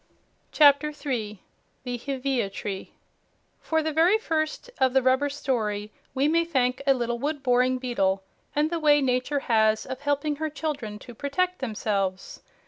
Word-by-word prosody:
CHAPTER 295 0 +5
3 230 -9 -4 0.4
THE 250 -1 -3
HEVEA 260 -3 -2
TREE 195 0 -6 0.6
For 320 -1 0
the 315 0 -1
very 340 +7 +4
first 320 +4 -2
of 260 -1 +3
the 265 - +4
rubber 260 +3 +3
story 220 -7 -2 0.2
we 270 +2 +2
may 335 +2 +3
thank 260 -5 0
a 270 - +6
little 240 -1 -2
wood 290 +1 -3
boring 255 0 +3
beetle, 195 -7 0 0.3
and 300 +2 +1
the 340 - -1
way 295 -2 +5
nature 265 +1 0
has 220 -2 +2
of 260 - -6
helping 290 +1 -1
her 315 +1 -2
children 285 -8 -4
to 240 +3 -12
protect 360 +9 -1
themselves. 200 -6 -2
265 Hz, 155 wpm, -26 LUFS, 235-300 Hz, 0.6 s, a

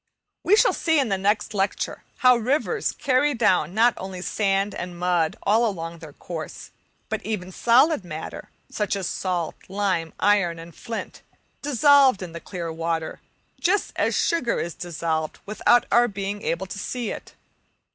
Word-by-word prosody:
We 400 - +5
shall - - +4
see 320 -1 +1
in 265 -5 +1
the 195 - +1
next 205 +2 0
lecture 195 -1 -1 0.2
how 250 0 +8
rivers 285 - 0
carry 280 +2 +1
down 185 -7 +2
not 235 +2 +5
only 185 -1 -6
sand 195 0 0
and 175 0 -6
mud 175 -2 +1
all 220 +4 +3
along 170 -6 -3
their 160 -2 -10
course, 160 -1 -8 0.4
but - - -3
even 190 -4 -4
solid 245 - +4
matter 160 -3 -7 0.2
such 210 -1 -2
as 195 -2 -3
salt, 175 -2 -2 0.2
lime, 185 -5 -1
iron, 195 -5 +3
and 165 +1 -10
flint, 230 +4 -7 0.4
dissolved 280 -5 +5
in 175 - -7
the 170 - -7
clear 170 -4 -5
water, 165 0 -3 0.4
just 385 +3 +1
as - - +1
sugar 280 -9 +1
is 170 - -3
dissolved, 160 -2 -3
without 215 +3 +3
our 240 0 +5
being 200 -1 -4
able 170 +3 -2
to 195 +2 -7
see 240 +2 -3
it. - - -9
195 Hz, 160 wpm, -24 LUFS, 170-235 Hz, 0.4 s, how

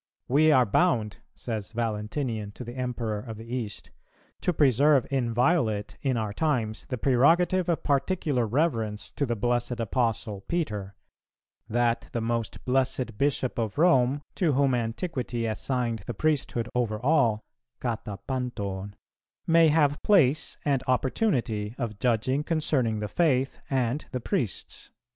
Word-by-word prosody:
"We 155 +4 +4
are 130 -4 +5
bound," 110 - +1 0.2
says 110 -2 -5
Valentinian 110 -1 -3
to 125 - -8
the 120 +1 -8
Emperor 120 -4 -2
of 110 -1 -8
the 110 - -9
East, 115 -3 -5 0.5
"to - - +1
preserve 140 -2 +4
inviolate 120 -3 +1
in 130 -3 0
our 110 -2 -2
times 115 -7 -1
the 130 - -2
prerogative 165 +9 +3
of 170 - 0
particular 140 -4 +1
reverence 115 -6 -1
to 140 - -2
the 120 - 0
blessed 120 +2 -1
Apostle 115 -2 -1
Peter; 105 - -2 0.7
that 120 0 +1
the 120 - 0
most 115 -1 -3
blessed 130 -2 0
Bishop 135 -3 0
of 110 +1 -2
Rome, 145 -4 +3
to 170 -7 +2
whom 135 0 +3
Antiquity 120 0 -2
assigned 115 +1 -1
the 120 - -4
priesthood 135 -5 0
over 115 -4 0
all 120 -5 +2 0.4
(κατὰ 110 -4 -4
πάντων) 100 -7 -3 0.5
may 165 0 +5
have 150 -2 +2
place 155 -8 +3
and 140 -3 +2
opportunity 125 - 0
of 115 -5 -4
judging 130 +4 +1
concerning 135 -9 0
the 105 - -2
faith 135 -3 +1
and 130 +1 0
the 125 - -2
priests." - - -3
125 Hz, 135 wpm, -27 LUFS, 115-145 Hz, 0.7 s, are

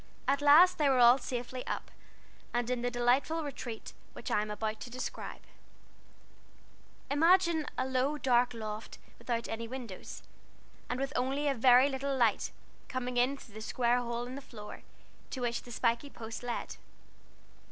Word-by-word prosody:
At 280 +1 +2
last 310 +6 +7
they 295 -2 +4
were 265 - +3
all 245 +2 +7
safely 250 0 -4
up, - - -4 0.6
and 240 -1 +1
in 250 -1 -1
the 245 - 0
delightful 250 +7 +1
retreat 245 -5 -6 0.2
which - - -7
I 210 - +3
am 210 - -4
about 215 +1 -3
to 225 - -7
describe: 255 +1 -6 1.7
Imagine 330 +1 +4
a 255 - +1
low, 265 +3 0
dark 245 -3 +2
loft 215 -1 -6 0.2
without 235 -1 -2
any 230 +1 -4
windows, 235 -6 -8 0.7
and 245 - -2
with 275 +1 -2
only 270 +4 0
a 280 - +3
very 250 +1 +6
little 275 0 -2
light 230 -5 +2 0.4
coming 250 -1 -3
in 255 +3 +2
through 225 - -15
the 215 - -8
square 240 +2 +1
hole 240 0 -3
in 250 - -7
the 275 - -6
floor, 210 -5 -10 0.5
to 260 - -5
which 235 -1 -1
the 240 - -12
spikey 235 +4 0
post 225 -4 -7
led. 245 -1 -4
245 Hz, 165 wpm, -31 LUFS, 235-275 Hz, 1.7 s, last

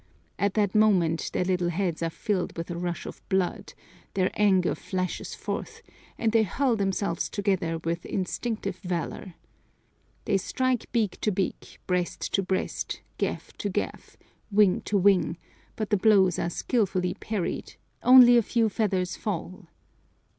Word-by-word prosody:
At 200 -1 +1
that 205 -3 +2
moment 185 -7 +3
their 180 - 0
little 180 -1 +1
heads 175 -2 -1
are 165 - 0
filled 185 +2 -2
with 165 +1 -4
a - - -3
rush 175 0 -3
of - - -8
blood, 190 -2 -1 0.4
their 185 -1 +2
anger 190 -4 +3
flashes 185 -2 -4
forth, 455 +1 -5 0.3
and 225 - +1
they 225 0 +4
hurl 240 +5 +1
themselves 195 -3 -1
together 190 -5 0
with 165 +1 -3
instinctive 195 +1 -3
valor. 180 -1 -4 0.9
They 195 - +2
strike 255 +5 -1
beak 220 -6 0
to 215 - +1
beak, 190 -1 -3
breast 180 -1 -2
to 195 - +3
breast, 190 0 -3 0.2
gaff - - -3
to - - -2
gaff, - - -4 0.3
wing 200 -3 +4
to 205 - +1
wing, 185 -4 +3 0.4
but 215 0 -4
the 205 - +4
blows 190 -4 +4
are 170 - 0
skilfully 185 -3 0
parried, 210 -5 -4 0.3
only 250 -1 +8
a - - +6
few 225 0 +1
feathers 190 -4 0
fall. 185 -1 -5
190 Hz, 145 wpm, -27 LUFS, 180-215 Hz, 0.9 s, only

